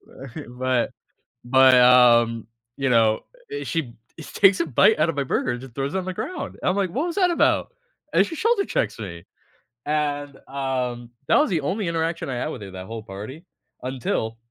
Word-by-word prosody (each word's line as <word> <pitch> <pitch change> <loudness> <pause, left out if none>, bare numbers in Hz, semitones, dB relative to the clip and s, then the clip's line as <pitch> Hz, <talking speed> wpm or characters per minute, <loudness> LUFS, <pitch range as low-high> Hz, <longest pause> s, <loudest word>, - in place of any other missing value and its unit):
But 135 -2 -10 0.3
but 130 -2 +1 0.5
but, 130 +1 +6
um, 120 -3 +5 0.3
you 135 -2 0
know 110 -2 +3 0.3
eh, 430 - -4
she 145 -8 -3 0.3
takes 195 +4 +3
a 170 - +1
bite 190 - +4
out 155 +2 +3
of 155 - -2
my 140 - 0
burger 130 - -1
and 120 - -5
just 130 -3 -11
throws 140 +6 -3
it - - +2
on 185 - -3
the 185 - -3
ground, 360 - -5
and - - +1
I'm 185 - +1
like, 195 -3 0
"What 290 - -1
was 340 - -4
that 365 -3 +3
about?" - - +2 0.4
And - - +5
she 330 - -7
shoulder 445 +3 +2
checks - - -2
me. 90 -5 -8 0.6
And, 145 -2 -2
um, 125 -3 -3 0.2
that - - +5
was 300 - +2
the 170 -4 +1
only 190 +7 -2
interaction 165 -1 -2
I 130 - -3
had 120 - -2
with - - -7
her, 100 - -8
that 95 0 -8
whole 115 +1 -7
party, 110 - -9 0.4
until 120 -3 -3
135 Hz, 205 wpm, -23 LUFS, 120-170 Hz, 0.6 s, but